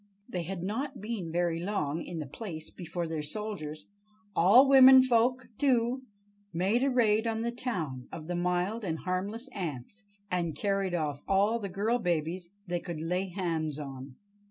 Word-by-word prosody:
They 180 - -3
had 175 +1 -5
not 260 +8 -3
been 205 -6 -4
very 170 -1 0
long 170 -5 -1
in 175 - -6
the 155 - -3
place 160 - -7
before 175 -1 -4
their 160 -1 -3
soldiers—all 205 - +1
womenfolk, 255 -2 +6
too!—made 210 - 0
a 275 - +3
raid 225 -3 +3
on 225 0 -1
the 235 +1 -1
town 170 - -4
of 155 - -7
the 175 +2 -3
mild 180 +5 0
and 165 -4 -2
harmless 195 - -3
ants, 175 - -5 0.3
and 170 -4 -1
carried 195 -3 0
off 150 -4 -2
all 205 +4 +3
the 200 -3 -4
girl 215 +6 0
babies 175 -2 -1 0.2
they 175 -2 -1
could 170 -2 -6
lay 180 +4 -1
hands 165 -5 -2
on. 135 -2 -7
190 Hz, 155 wpm, -30 LUFS, 165-225 Hz, 0.3 s, womenfolk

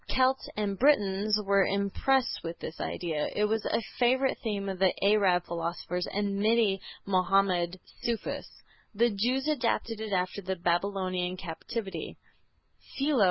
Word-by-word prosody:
Celts 260 +1 +2
and 200 -2 -1
Britons 210 -6 +3
were 200 0 +4
impressed 200 +7 +1
with 165 0 -5
this 160 - -7
idea. 160 -4 -2
It 210 - +2
was 220 +1 0
a 230 - 0 0.2
favorite 260 +2 +3
theme 205 -3 -2
of 190 -2 -4
the 190 -1 +4
Arab 195 -4 +4
philosophers 170 +1 -3
and 200 0 -1
many 215 -2 +3 0.3
Mahomedan 185 -1 +2 0.2
Sufis. 230 -2 -2 0.5
The 235 +3 +3
Jews 250 +7 0
adopted 235 -6 0
it 220 -1 -4
after 185 +1 -1
the 190 0 -2
Babylonian 185 +1 -1
captivity. 190 +3 -5
200 Hz, 130 wpm, -29 LUFS, 185-225 Hz, 0.5 s, were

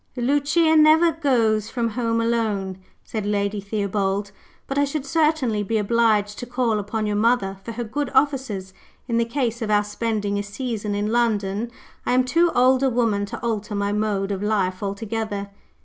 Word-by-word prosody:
"Lucia 290 +6 +2
never 315 +2 +6
goes 230 -9 +1
from 235 -1 -1
home 230 0 -1
alone," 215 -5 -1 0.2
said 215 -2 -4
Lady 205 0 -1
Theobald; 200 -1 -1 0.3
"but 275 +1 -2
I - - +4
should 280 0 -2
certainly 300 -7 +1
be 220 +2 -1
obliged 210 -1 +2
to 245 - -6
call 245 -3 0
upon 215 +2 -3
your 210 0 -1
mother 210 -3 +1
for 230 - -6
her 240 +2 -3
good 285 +6 -3
offices, 260 -9 0 0.3
in 235 -2 +1
the 235 - +2
case 235 -1 -2
of 220 - -2
our 210 0 +3
spending 205 -1 -2
a - - 0
season 210 0 -4
in 205 +1 -1
London. 220 -2 0 0.3
I - - 0
am 255 0 +4
too 335 +7 +2
old 255 +1 +4
a 270 - +3
woman 225 -5 +1
to - - -6
alter 215 -2 -2
my 200 0 0
mode 205 -2 -1
of 195 -1 -3
life 195 -3 0
altogether." 205 0 -3
220 Hz, 180 wpm, -23 LUFS, 205-250 Hz, 0.3 s, never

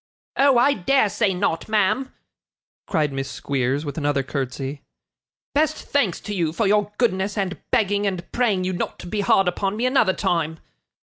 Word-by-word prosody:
'Oh, 275 -2 +4
I 265 +4 +5
dare 240 +1 +2
say 205 -1 +1
not, 180 -1 -1
ma'am!' 215 +5 +1 0.8
cried 150 -3 0
Miss 135 0 -3
Squeers, 140 +2 -1
with 145 +2 -4
another 145 -2 0
curtsy. 135 +1 -4 0.7
'Best 310 +1 +2
thanks 235 -12 0
to 210 - -5
you 170 -5 0
for 220 - 0
your 210 +1 +2
goodness, 200 -3 0
and 195 -2 -2
begging 205 -1 +2
and 185 -3 -4
praying 215 -7 +1
you 185 +1 -1
not 175 - -3
to - - -10
be 205 +4 -2
hard 195 -1 +3
upon 195 +3 -1
me 240 - 0
another 255 -7 +3
time! 160 -3 -1
195 Hz, 175 wpm, -23 LUFS, 160-215 Hz, 0.8 s, I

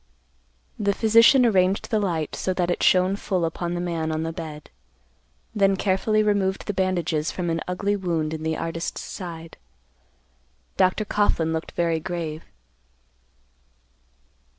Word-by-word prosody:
The 200 -2 +1
physician 230 +4 +6
arranged 195 0 +2
the 220 - +2
light 170 -7 -2
so 185 - -2
that 180 -1 0
it - - -2
shone 185 +1 +4
full 185 -4 -1
upon 170 +1 -3
the - - -2
man 165 -2 -2
on 155 0 -2
the 165 0 -3
bed, 155 -3 -8 0.8
then 195 -2 +3
carefully 205 +3 +1
removed 200 -2 0
the 205 - -2
bandages 175 -5 0
from 175 -2 -2
an 165 0 -1
ugly 200 +3 -1
wound 165 -5 -2
in 160 - -5
the 160 0 -1
artist's 165 0 -4
side. 165 -3 -8 1.2
Dr. 185 +3 +2
Coughlan 170 -6 +1
looked 160 0 -4
very 165 -2 0
grave. 160 -2 -5
180 Hz, 140 wpm, -24 LUFS, 165-195 Hz, 1.2 s, physician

